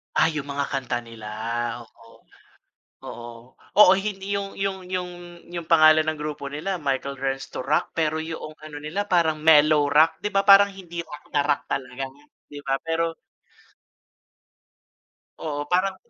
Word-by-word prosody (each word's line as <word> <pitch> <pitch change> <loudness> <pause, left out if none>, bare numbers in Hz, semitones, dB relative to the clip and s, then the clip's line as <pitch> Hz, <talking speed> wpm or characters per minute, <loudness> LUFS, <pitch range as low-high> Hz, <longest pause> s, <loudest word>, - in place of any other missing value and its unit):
Ah, 160 - +4
yung 150 -3 -4
mga 140 0 -3
kanta 135 -3 -2
nila. 115 -2 -11 0.6
Oo. 115 0 -20 0.8
Oo. 120 0 -8 0.4
Oo, 195 -2 +8
hindi 200 0 -3
yung 195 0 -5
yung 190 -1 -3
yung 180 -1 -2 0.4
yung 170 -2 -5
pangalan 155 -1 +6
ng 160 - 0
grupo 150 -1 -5
nila 160 +7 -3
Michael 140 -2 -2
Learns 135 0 -3
to 130 - -6
Rock 150 +2 +1
pero 160 -1 0
yoong 160 -1 -6
ano 155 -1 -9
nila 175 +8 -4
parang 160 -4 +2
mellow 150 -2 +5
rock. 155 +3 +4
Di 210 - -1
ba 195 -1 +1
parang 200 0 +8
hindi 175 -3 -7
rock 150 -3 -11
na 145 - +3
rock 145 0 0
talaga 130 0 -4 0.4
di 145 -1 -10
ba? 135 -1 -1
Pero 165 0 -1 2.3
Oo. 145 -2 -4
Parang 185 +4 +1
155 Hz, 155 wpm, -24 LUFS, 145-180 Hz, 2.3 s, Oo